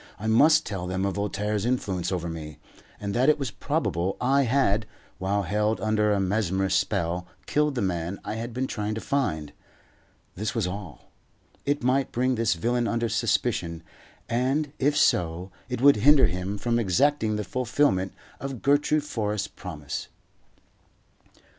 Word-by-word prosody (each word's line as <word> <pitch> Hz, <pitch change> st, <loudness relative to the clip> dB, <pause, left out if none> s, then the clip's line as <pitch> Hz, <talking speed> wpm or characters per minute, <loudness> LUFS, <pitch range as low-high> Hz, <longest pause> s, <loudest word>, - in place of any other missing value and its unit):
I 105 Hz, -, -7 dB
must 150 Hz, +9 st, +5 dB
tell 90 Hz, -3 st, -4 dB
them 95 Hz, +1 st, -1 dB
of 100 Hz, -, 0 dB
Voltaire's 105 Hz, +1 st, -1 dB
influence 100 Hz, -8 st, -1 dB
over 85 Hz, -2 st, -2 dB
me, 80 Hz, -3 st, -7 dB, 0.4 s
and 100 Hz, -1 st, -3 dB
that 130 Hz, +6 st, +3 dB
it 150 Hz, -, +4 dB
was 135 Hz, -5 st, -3 dB
probable 90 Hz, +3 st, -1 dB
I 135 Hz, +2 st, +3 dB
had, 115 Hz, -4 st, +2 dB, 0.3 s
while 100 Hz, +2 st, 0 dB
held 105 Hz, +4 st, 0 dB
under 105 Hz, -1 st, +2 dB
a 100 Hz, -, +2 dB
mesmerist's 95 Hz, -1 st, +1 dB
spell, 90 Hz, -2 st, -2 dB, 0.2 s
killed 150 Hz, -1 st, +1 dB
the 120 Hz, -, 0 dB
man 90 Hz, 0 st, -2 dB
I 105 Hz, -, -3 dB
had 115 Hz, +2 st, -4 dB
been 130 Hz, +3 st, -2 dB
trying 105 Hz, -4 st, -3 dB
to -, -, -3 dB
find. 90 Hz, -, -1 dB, 0.8 s
This 105 Hz, +5 st, -3 dB
was 115 Hz, -5 st, +1 dB
all. 90 Hz, -3 st, -7 dB, 0.6 s
It 145 Hz, -2 st, 0 dB
might 130 Hz, +1 st, +2 dB
bring 130 Hz, +2 st, +1 dB
this 115 Hz, -5 st, +1 dB
villain 120 Hz, +7 st, 0 dB
under 115 Hz, 0 st, 0 dB
suspicion, 110 Hz, -7 st, 0 dB, 0.4 s
and, 135 Hz, +5 st, 0 dB
if 145 Hz, +2 st, +2 dB
so, 90 Hz, -, +2 dB, 0.2 s
it 125 Hz, -1 st, -3 dB
would 140 Hz, -2 st, +7 dB
hinder 140 Hz, +5 st, +6 dB
him 90 Hz, +3 st, -2 dB
from 120 Hz, +2 st, 0 dB
exacting 110 Hz, +3 st, +2 dB
the 105 Hz, -, -2 dB
fulfilment 110 Hz, -, +1 dB, 0.3 s
of 135 Hz, -4 st, -6 dB
Gertrude 145 Hz, +2 st, +3 dB
Forrest's 105 Hz, -7 st, -2 dB
promise. 75 Hz, -5 st, -6 dB
105 Hz, 155 wpm, -26 LUFS, 95-125 Hz, 0.8 s, would